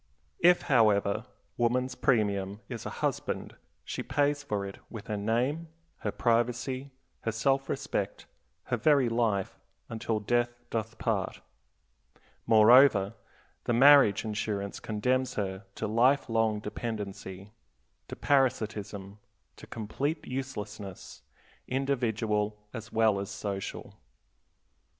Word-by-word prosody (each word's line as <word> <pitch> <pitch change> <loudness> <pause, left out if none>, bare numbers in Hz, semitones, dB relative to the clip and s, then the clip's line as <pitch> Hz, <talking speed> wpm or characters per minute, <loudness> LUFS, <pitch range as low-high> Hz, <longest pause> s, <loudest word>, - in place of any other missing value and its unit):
If, 175 +1 +5
however, 110 -4 +3 0.3
woman's 125 +2 +1
premium 105 -5 0
is - - -6
a - - -7
husband, - - -3 0.3
she - - -4
pays 145 0 +1
for 105 -7 -3
it 100 - -8
with 115 -3 -8
her 105 - -3
name, 120 +10 0 0.3
her - - -3
privacy, 120 +3 0 0.3
her 115 - -2
self 135 +5 +1
respect, 135 -8 -3 0.4
her 120 - -1
very 135 0 +4
life, 115 -5 0 0.3
"until 110 -1 -2
death 120 +2 0
doth 110 -1 -3
part." - - -2 1.1
Moreover, 110 -2 +6 0.5
the 120 - +1
marriage 135 -5 +6
insurance 105 -2 -3
condemns 125 +4 -1
her 95 -1 -3
to - - -3
life 125 +7 +3
long 115 -2 +1
dependency, 105 -3 -6 0.6
to - - -7
parasitism, 110 -7 0 0.4
to - - -13
complete 140 +8 -3
uselessness, 105 -7 -6 0.5
individual 110 -6 0 0.2
as 115 -2 -7
well 110 -3 +3
as 100 - -5
social. 100 -2 -6
115 Hz, 110 wpm, -29 LUFS, 105-130 Hz, 1.1 s, Moreover